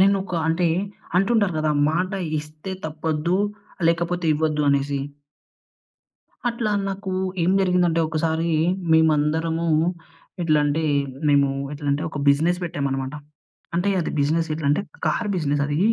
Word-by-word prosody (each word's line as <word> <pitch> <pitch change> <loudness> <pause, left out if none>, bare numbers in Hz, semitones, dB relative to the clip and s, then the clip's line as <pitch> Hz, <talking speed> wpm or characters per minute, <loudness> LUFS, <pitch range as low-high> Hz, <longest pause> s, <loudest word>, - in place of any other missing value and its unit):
నేనొక 195 -1 +2
అంటే 165 +1 +2 0.5
అంటుంటారు 205 -3 +2
గదా, 155 -1 +1 0.2
మాట 180 +3 0 0.3
ఇస్తే 155 +5 -8
తప్పొద్దు 160 +2 -1 0.5
లేకపోతే 170 +1 0
ఇవ్వద్దు 150 -1 0
అనేసి. 140 0 0 1.5
అట్లా 235 -2 -1 0.2
నాకు 195 0 -4 0.3
ఏం 170 - +3
జరిగిందంటే 180 -3 +2
ఒకసారి 160 +1 0 0.4
మేమందరము 160 +1 +2 0.8
ఎట్లా 155 -2 +3
అంటే, 145 +2 0 0.5
మేము 140 -1 +4 0.2
ఎట్లంటే 145 0 -1
ఒక 150 - -6
బిజినెస్ 160 +5 +3
పెట్టామనమాట. 135 -4 -2 0.6
అంటే, 175 +4 +1
అది 165 - -2
బిజినెస్ 160 +3 +1
ఎట్లా 155 -2 -4
అంటే 150 +7 +2 0.2
కార్ 225 - 0
బిజినెస్ 145 -3 0
అది. 145 +1 -1
160 Hz, 115 wpm, -23 LUFS, 150-175 Hz, 1.5 s, మేము